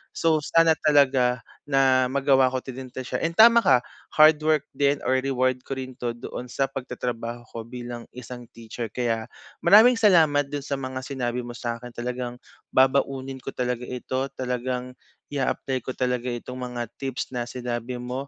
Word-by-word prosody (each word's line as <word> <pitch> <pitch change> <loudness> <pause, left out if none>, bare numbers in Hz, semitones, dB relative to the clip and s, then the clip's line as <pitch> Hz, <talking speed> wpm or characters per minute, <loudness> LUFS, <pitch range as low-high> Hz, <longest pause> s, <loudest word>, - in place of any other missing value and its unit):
So, 160 -2 +2
sana 165 +2 +4
talaga 130 -5 +3 0.2
na 135 -2 +3
magawa 135 -1 +4
ko 130 - -1
din 130 0 -7
talaga 130 - -6
siya. - - +1
And 165 0 -1
tama 230 +3 +8
ka, 125 -1 +4 0.3
hardwork 155 -1 +5
din 140 0 +2
or 130 - +2
reward 130 -1 0
ko 135 - -3
rin 130 0 -6
'to 120 -1 -3
doon 120 +1 -7
sa 135 - 0
pagtatrabaho 120 -2 -5
ko 115 - -6
bilang 120 -1 -7
isang 125 -1 -9
teacher. 115 0 -6
Kaya, 115 -3 -1 0.4
maraming 215 +8 +7
salamat 160 -9 +4
do'n 145 0 -5
sa 140 - -2
mga 130 -1 -4
sinabi 125 -2 -3
mo 120 - -7
sa'kin, 120 +1 -5
talagang 125 0 -4 0.3
babaunin 135 0 +1
ko - - -5
talaga 125 -1 -2
ito. 130 +2 -3
Talagang 125 0 -3 0.4
i-aapply 135 -2 -2
ko - - -4
talaga 125 -1 -1
itong 125 +1 -6
mga 120 -2 -4
tips 135 -2 -4
na 120 - -1
sinabi 120 0 -4
mo, 125 +3 -5
130 Hz, 165 wpm, -25 LUFS, 125-140 Hz, 0.4 s, tama